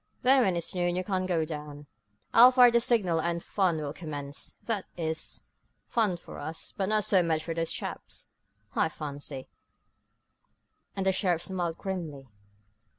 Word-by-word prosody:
Then, 265 Hz, +1 st, +6 dB
when 190 Hz, -6 st, +2 dB
it's 170 Hz, -, -2 dB
noon 175 Hz, -1 st, 0 dB
you 185 Hz, -, -1 dB
can 185 Hz, -1 st, -1 dB
go 165 Hz, -3 st, +1 dB
down, 150 Hz, -2 st, -7 dB, 0.5 s
I'll 240 Hz, +2 st, +10 dB
fire 250 Hz, -1 st, +7 dB
the 235 Hz, -, +5 dB
signal 200 Hz, -9 st, +2 dB
and 170 Hz, +1 st, -1 dB
the -, -, -15 dB
fun 185 Hz, -5 st, +1 dB
will 150 Hz, -2 st, -4 dB
commence 145 Hz, -3 st, -6 dB
that 215 Hz, -5 st, -2 dB
is, 160 Hz, -1 st, -3 dB, 0.4 s
fun 215 Hz, -7 st, +1 dB
for -, -, -11 dB
us, 160 Hz, +1 st, -5 dB
but 195 Hz, 0 st, -1 dB
not 215 Hz, -1 st, +3 dB
so 190 Hz, -2 st, +5 dB
much 160 Hz, -2 st, 0 dB
for 165 Hz, -, -3 dB
those 165 Hz, 0 st, -1 dB
chaps, -, -, -6 dB, 0.5 s
I 160 Hz, -, +2 dB
fancy," 145 Hz, -3 st, -7 dB, 1.5 s
and 195 Hz, -, -2 dB
the 190 Hz, -, +4 dB
sheriff 180 Hz, -3 st, +1 dB
smiled 175 Hz, -3 st, -2 dB
grimly. 165 Hz, -8 st, -5 dB
175 Hz, 165 wpm, -29 LUFS, 160-195 Hz, 1.5 s, I'll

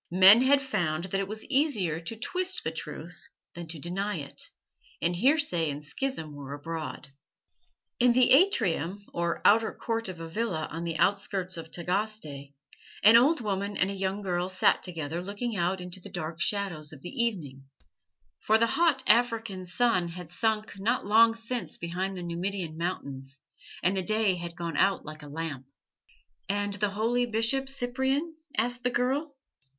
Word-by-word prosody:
Men 190 Hz, +6 st, +8 dB
had 275 Hz, +1 st, +4 dB
found 170 Hz, -11 st, -1 dB
that 190 Hz, +1 st, -2 dB
it 195 Hz, -, -2 dB
was 215 Hz, +2 st, -6 dB
easier 260 Hz, -, +1 dB
to 170 Hz, +7 st, -6 dB
twist 365 Hz, -, -1 dB
the -, -, -1 dB
truth -, -, -8 dB, 0.2 s
than 170 Hz, -1 st, -8 dB
to 160 Hz, 0 st, -6 dB
deny 195 Hz, +6 st, -3 dB
it, 140 Hz, -3 st, -5 dB, 0.6 s
and 170 Hz, +1 st, 0 dB
heresy 245 Hz, -, +3 dB
and 145 Hz, +1 st, -5 dB
schism 160 Hz, -, -3 dB
were 140 Hz, -1 st, -7 dB
abroad. 155 Hz, -1 st, -6 dB, 0.9 s
In 245 Hz, -1 st, +5 dB
the 250 Hz, 0 st, +4 dB
atrium 200 Hz, -, +3 dB
or 170 Hz, 0 st, -2 dB
outer 220 Hz, +2 st, +5 dB
court 225 Hz, -3 st, -3 dB
of 180 Hz, -2 st, -7 dB
a 165 Hz, -, -6 dB
villa 170 Hz, -3 st, -2 dB
on 165 Hz, +2 st, -4 dB
the 165 Hz, -1 st, -2 dB
outskirts 190 Hz, +1 st, 0 dB
of 165 Hz, -1 st, -8 dB
Tagaste 175 Hz, -6 st, -3 dB, 0.5 s
an 215 Hz, +3 st, +8 dB
old 280 Hz, +6 st, +5 dB
woman 200 Hz, -1 st, -2 dB
and 190 Hz, +1 st, +1 dB
a -, -, -3 dB
young 195 Hz, +1 st, -2 dB
girl 180 Hz, -2 st, -1 dB
sat 185 Hz, 0 st, +3 dB
together 165 Hz, -2 st, -4 dB
looking 205 Hz, +5 st, -4 dB
out 180 Hz, +1 st, 0 dB
into 180 Hz, +1 st, -8 dB
the -, -, -11 dB
dark 165 Hz, -1 st, -5 dB
shadows 175 Hz, -7 st, 0 dB
of 145 Hz, -4 st, -11 dB
the -, -, -6 dB
evening, 145 Hz, -, -4 dB, 0.7 s
for 220 Hz, -, +3 dB
the 230 Hz, -, +3 dB
hot 325 Hz, -6 st, +3 dB
African 225 Hz, -5 st, +2 dB
sun 185 Hz, -1 st, +2 dB
had 175 Hz, -1 st, -8 dB
sunk 220 Hz, -1 st, -1 dB
not 230 Hz, +4 st, 0 dB
long 225 Hz, +2 st, +5 dB
since 230 Hz, -5 st, -4 dB
behind 185 Hz, +3 st, -3 dB
the 180 Hz, -, -5 dB
Numidian 175 Hz, -1 st, -3 dB
Mountains, 140 Hz, -6 st, -4 dB, 0.4 s
and 185 Hz, +2 st, +2 dB
the 190 Hz, -, 0 dB
day 215 Hz, +1 st, +2 dB
had 170 Hz, -1 st, -6 dB
gone 170 Hz, -2 st, -4 dB
out 195 Hz, 0 st, +2 dB
like 155 Hz, +1 st, -9 dB
a 145 Hz, -, -10 dB
lamp. 145 Hz, -4 st, -5 dB, 0.8 s
"And 205 Hz, 0 st, -1 dB
the 205 Hz, 0 st, +1 dB
holy 230 Hz, +4 st, 0 dB
Bishop 235 Hz, +4 st, +2 dB
Cyprian?" 270 Hz, +5 st, -1 dB, 0.2 s
asked 245 Hz, +3 st, +2 dB
the 250 Hz, -, +2 dB
girl. 270 Hz, +5 st, -1 dB
195 Hz, 170 wpm, -28 LUFS, 170-230 Hz, 0.9 s, Men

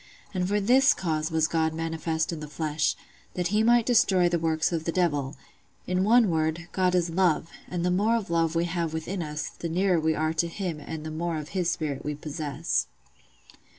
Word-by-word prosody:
And 180 Hz, -1 st, 0 dB
for 205 Hz, +2 st, +1 dB
this 265 Hz, +7 st, +5 dB
cause 160 Hz, -3 st, -1 dB
was 160 Hz, -1 st, +2 dB
God 160 Hz, -1 st, 0 dB
manifest 160 Hz, 0 st, -2 dB
in 160 Hz, -, -5 dB
the 150 Hz, -, -7 dB
flesh, 150 Hz, 0 st, -1 dB, 0.4 s
that 180 Hz, -1 st, -1 dB
He 210 Hz, +2 st, +2 dB
might 235 Hz, 0 st, +4 dB
destroy 190 Hz, -7 st, +4 dB
the 175 Hz, -1 st, +1 dB
works 160 Hz, 0 st, +1 dB
of 165 Hz, -2 st, -2 dB
the 165 Hz, -, 0 dB
Devil: 145 Hz, -6 st, 0 dB, 0.5 s
in 180 Hz, +1 st, 0 dB
one 225 Hz, -1 st, +5 dB
word, 160 Hz, +2 st, -1 dB
God 185 Hz, -1 st, +1 dB
is 175 Hz, -2 st, +1 dB
LOVE; 165 Hz, -2 st, +1 dB, 0.2 s
and 175 Hz, -1 st, -3 dB
the 180 Hz, -, +2 dB
more 210 Hz, +5 st, +2 dB
of 210 Hz, -7 st, -3 dB
love 165 Hz, -1 st, +1 dB
we 165 Hz, +1 st, +2 dB
have 170 Hz, -2 st, -2 dB
within 175 Hz, +4 st, -3 dB
us, 150 Hz, -2 st, -4 dB
the 170 Hz, -, -6 dB
nearer 180 Hz, +1 st, +2 dB
we 160 Hz, 0 st, +1 dB
are 155 Hz, +1 st, 0 dB
to 165 Hz, +1 st, 0 dB
Him 170 Hz, -2 st, -4 dB
and 155 Hz, +1 st, -7 dB
the 155 Hz, -, -4 dB
more 165 Hz, +1 st, -2 dB
of 150 Hz, -1 st, -6 dB
His 180 Hz, -3 st, 0 dB
spirit 145 Hz, -4 st, -3 dB
we 150 Hz, 0 st, -3 dB
possess. 150 Hz, 0 st, -2 dB
165 Hz, 210 wpm, -27 LUFS, 155-180 Hz, 0.5 s, this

